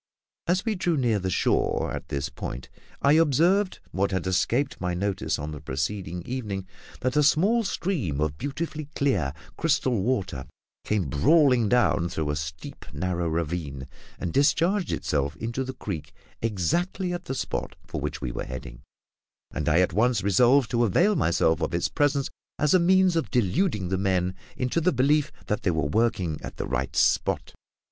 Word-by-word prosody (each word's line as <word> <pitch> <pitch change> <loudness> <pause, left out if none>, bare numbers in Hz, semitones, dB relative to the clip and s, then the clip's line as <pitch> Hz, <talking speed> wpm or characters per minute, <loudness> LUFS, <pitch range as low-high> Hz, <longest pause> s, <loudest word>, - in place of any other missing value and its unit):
As 180 +4 +1
we 225 - +1
drew 175 -4 0
near 120 -6 +2
the 95 0 -2
shore - - +1
at - - -6
this 70 0 -3
point 65 +2 -6 0.3
I 140 - +5
observed 165 +6 +3
what 100 +1 +1
had 95 -1 -2
escaped 115 +9 0
my 90 -1 -1
notice 100 +1 -1
on 75 +1 -5
the 75 -2 -7
preceding 85 +5 -3
evening 105 -5 -4 0.4
that 130 +2 0
a 150 - +5
small 195 +11 +3
stream 150 - -2
of 75 -1 0
beautifully 155 +1 -4
clear, 100 - +1 0.3
crystal 135 -8 +1
water 95 - -1 0.4
came 105 -7 0
brawling 125 - +4
down 110 -8 +3
through 75 -3 -2
a - - -2
steep, 75 0 -6
narrow 85 +3 -2
ravine, 80 -5 -3 0.3
and 90 -3 -4
discharged 170 +7 +2
itself 70 0 -1
into 115 - -3
the 130 0 -5
creek 80 - -6 0.3
exactly 170 - 0
at 175 - -5
the 135 - -3
spot - - -3
for - - -5
which - - -4
we 60 - -3
were - - -4
heading, 60 -1 -8 0.7
and 75 -1 -1
I 85 +4 +4
at 90 - +1
once 115 -2 +2
resolved 120 +6 +4
to 120 -1 +2
avail 175 - +3
myself 80 - +2
of - - -1
its 85 - 0
presence 145 -2 +1 0.3
as 150 -1 +2
a 185 - +6
means 185 0 +4
of 165 - 0
deluding 120 - +1
the 95 0 0
men 95 -2 +1 0.2
into 125 +6 0
the 180 +3 +3
belief 145 +4 +2
that 105 - -1
they - - +1
were 80 -4 0
working 95 -3 0
at - - -8
the - - -3
right 65 +1 -2
spot. - - +1
105 Hz, 175 wpm, -26 LUFS, -, 0.7 s, a